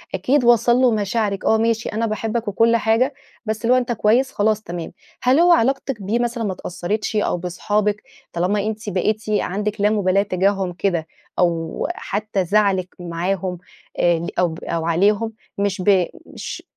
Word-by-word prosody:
أكيد 250 +9 +2
وصَل 240 0 +5
له 255 -1 +4
مشاعرِك، 205 -1 -1
آه، 220 - +4
ماشي 225 0 0
أنا 225 +2 -1
باحبك 225 +1 -2
وكل 230 +3 +3
حاجة، 230 +5 +2 0.3
بس 220 -1 -2
اللي 235 +2 +4
هو - - +5
أنت 245 -1 -1
كويس؟ 235 +4 +2
خلاص، 215 0 +1
تمام. 170 -3 -6 0.3
هل 255 +4 +4
هو 350 +1 +6
علاقتِك 270 -5 +1
بيه 210 +5 0
مثلًا 240 -1 -1
ما 200 -3 -1
اتأثَّرِتش 185 +5 -3
أو 210 -4 +1
باصحابِك، 205 +4 -1 0.3
طالما 195 +4 0
أنتِ 215 -1 -4
بقيتِ 210 +3 0
عندِك 210 0 -1
لا 205 - +4
مبالاة 200 -2 +2
تجاههم 195 -1 0
كده 175 -3 -1 0.3
أو 165 -2 0
حتى 205 -2 -2
زعلِك 195 -1 +1
معاهم، 180 +2 -2 0.4
آآ، 175 -1 +3
ل 170 - -4
أو 175 -3 +1
أو 165 -1 -2
عليهم، 205 +6 +2 0.2
مش 200 -1 -1
ب 185 -1 +4 0.2
مش - - -7
210 Hz, 165 wpm, -21 LUFS, 185-225 Hz, 0.4 s, هو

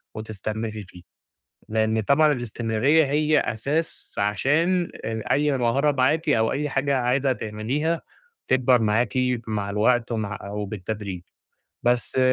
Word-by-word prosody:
وتستمري 110 0 -5
فيه، 90 -1 -14 0.7
لأن 110 0 +1
طبعًا 145 +7 +4
الاستمرارية 120 +5 +1
هي 150 +2 +2
أساس 145 +9 -3
عشان 160 - +1
ان 110 0 -3
أي 145 +3 +1
مهارة 135 +5 +2
معاكِ 150 +5 +1
أو 110 -5 +3
أي 150 +2 -1
حاجة 135 0 0
عايزة 130 +2 +1
تعمليها 125 +9 -2 0.5
تكبَر 130 -1 +4
معاكِ 110 +1 +1 0.3
مع 105 -2 -2
الوقت 120 +3 +2
ومع 105 -2 -3
أو 105 +1 -4
بالتدريب. 100 -2 -5 0.6
بس 120 +2 +1
120 Hz, 120 wpm, -24 LUFS, 110-140 Hz, 0.7 s, طبعًا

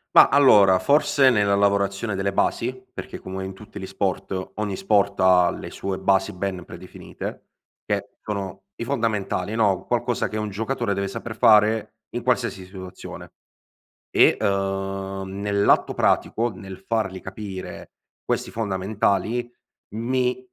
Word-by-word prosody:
Mah, - - +10
allora, 105 -10 +6
forse 140 -2 +4
nella 105 -4 +3
lavorazione 100 +1 +1
delle 95 0 -1
basi? - - 0 0.2
Perché - - -7
come 95 0 -6
in 95 - -6
tutti 105 +1 -11
gli 95 - -5
sport, 95 -1 -3
ogni 105 -2 -2
sport 100 0 +1
ha 90 -1 +5
le - - -7
sue 95 -1 -4
basi 95 +1 +2
ben 90 -1 -4
predefinite, - - -9 0.4
che - - -3
sono 95 -2 -5
i 115 - -4
fondamentali, 110 -6 -1
no, 100 -5 +1
qualcosa 120 0 0
che 110 - -5
un 105 -1 -2
giocatore 115 0 -2
deve 100 0 -1
saper 110 +3 -6
fare 110 0 +4 0.2
in 120 - -3
qualsiasi 120 -7 0
situazione 95 -1 -10 0.8
e, - - +5
ehm, 95 0 -2 0.2
nell'atto 100 0 +2
pratico, 120 +2 +1
nel 95 -1 -9
fargli 95 -2 -2
capire 95 0 -8 0.3
questi - - -2
fondamentali, 110 +3 -1 0.4
mi 125 +2 -1
100 Hz, 135 wpm, -23 LUFS, 95-110 Hz, 0.8 s, Mah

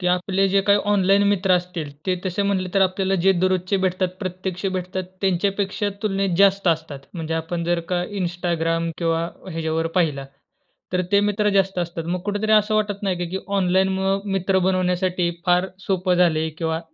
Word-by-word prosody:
की 180 - -2
आपले 190 +2 +1
जे 195 +1 +3
काही 200 +1 +4
ऑनलाईन 195 0 +4
मित्र 195 -2 +2
असतील 180 -4 -1
ते 185 - +2
तसे 185 +2 -1
म्हटले, 195 -2 0
तर 195 - +3
आपल्याला 190 +1 +1
जे 195 - +7
दररोजचे 185 +1 +1
भेटतात, 185 0 +1
प्रत्यक्ष 185 0 -4
भेटतात 185 0 -3 0.2
त्यांच्यापेक्षा 195 +2 0
तुलनेत 195 -4 0
जास्त 195 0 +4
असतात. 160 -3 -1 0.2
म्हणजे 165 -2 -3
आपण 165 +1 -3
जर 175 0 +1
का 175 0 +1 0.2
Instagram 170 -2 -1
किंवा 165 -1 0 0.3
ह्याच्यावर 165 -1 -1
पाहिलं. 150 -6 +1 0.7
तर 180 - +2
ते 200 - +6
मित्र 210 0 +1
जास्त 195 -1 +2
असतात. 170 -1 -3
मग 180 +1 -2
कुठेतरी 205 +1 0
असं 215 0 +4
वाटत 210 -1 -1
नाही 190 -3 0
का, 175 - -2
की 190 - -2 0.2
ऑनलाईन 190 0 +2
मुळं 190 +1 0
मित्र 190 0 +1
बनवण्यासाठी 180 -1 +1 0.2
फार 180 +1 +3 0.2
सोपं 185 -1 +1
झालंय 160 -3 +2
किंवा 160 -1 -1
185 Hz, 175 wpm, -22 LUFS, 175-195 Hz, 0.7 s, जे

